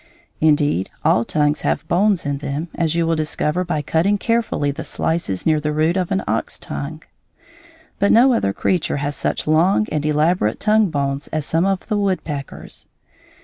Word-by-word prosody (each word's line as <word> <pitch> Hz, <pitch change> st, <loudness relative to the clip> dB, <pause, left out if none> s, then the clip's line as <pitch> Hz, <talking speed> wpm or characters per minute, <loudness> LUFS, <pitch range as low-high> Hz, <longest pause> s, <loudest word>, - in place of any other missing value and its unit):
Indeed, 150 Hz, -, +2 dB, 0.2 s
all 115 Hz, -, +4 dB
tongues 150 Hz, +4 st, +1 dB
have -, -, -1 dB
bones 190 Hz, 0 st, +2 dB
in 140 Hz, -1 st, -2 dB
them, 145 Hz, +3 st, -4 dB
as 165 Hz, -2 st, -1 dB
you 170 Hz, -1 st, +1 dB
will 165 Hz, 0 st, +1 dB
discover 155 Hz, +2 st, -1 dB
by 160 Hz, -4 st, -2 dB
cutting 175 Hz, +8 st, +1 dB
carefully 225 Hz, -10 st, 0 dB
the 140 Hz, -, -6 dB
slices 160 Hz, -, -2 dB
near 155 Hz, -1 st, +3 dB
the 150 Hz, 0 st, -2 dB
root 155 Hz, +3 st, +1 dB
of 185 Hz, -2 st, -1 dB
an 195 Hz, -1 st, 0 dB
ox -, -, -2 dB
tongue; -, -, -6 dB, 1.0 s
but 200 Hz, -, +3 dB
no 250 Hz, +3 st, +6 dB
other 100 Hz, -, +1 dB
creature 175 Hz, -, 0 dB
has 145 Hz, 0 st, -2 dB
such -, -, -1 dB
long 170 Hz, +7 st, +3 dB
and 150 Hz, -1 st, -1 dB
elaborate 150 Hz, -5 st, +1 dB
tongue 215 Hz, -2 st, +3 dB
bones 140 Hz, -2 st, -2 dB
as 155 Hz, -2 st, -3 dB
some 165 Hz, +5 st, +1 dB
of 195 Hz, -1 st, -1 dB
the 210 Hz, -, -1 dB
woodpeckers. 160 Hz, -8 st, -3 dB
160 Hz, 175 wpm, -20 LUFS, 145-185 Hz, 1.0 s, no